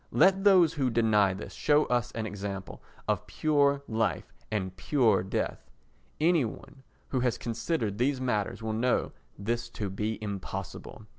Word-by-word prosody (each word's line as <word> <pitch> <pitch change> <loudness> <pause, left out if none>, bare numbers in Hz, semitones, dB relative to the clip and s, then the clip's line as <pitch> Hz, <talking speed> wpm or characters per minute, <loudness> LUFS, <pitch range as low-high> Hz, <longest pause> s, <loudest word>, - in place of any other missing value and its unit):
Let 195 0 +4
those 185 -5 +6
who 135 -4 0
deny 105 -4 +3
this 100 - -8
show 150 0 +3
us 120 0 0
an 115 -1 -3
example 100 -2 -6 0.3
of - - 0
pure 140 -2 +2
life 110 -1 -1 0.2
and 95 -3 -2
pure 110 0 +2
death. 95 - -3 0.5
Any 165 -1 +4
one 120 +4 -8 0.3
who 130 - 0
has 125 -1 +1
considered 115 - -2
these 130 +2 +1
matters 115 -4 -1
will 110 -1 -2
know 120 +3 +1 0.3
this 120 +3 -2
to 100 -3 -2
be 105 +3 -2
impossible. 105 +1 -6
115 Hz, 150 wpm, -29 LUFS, 105-140 Hz, 0.5 s, those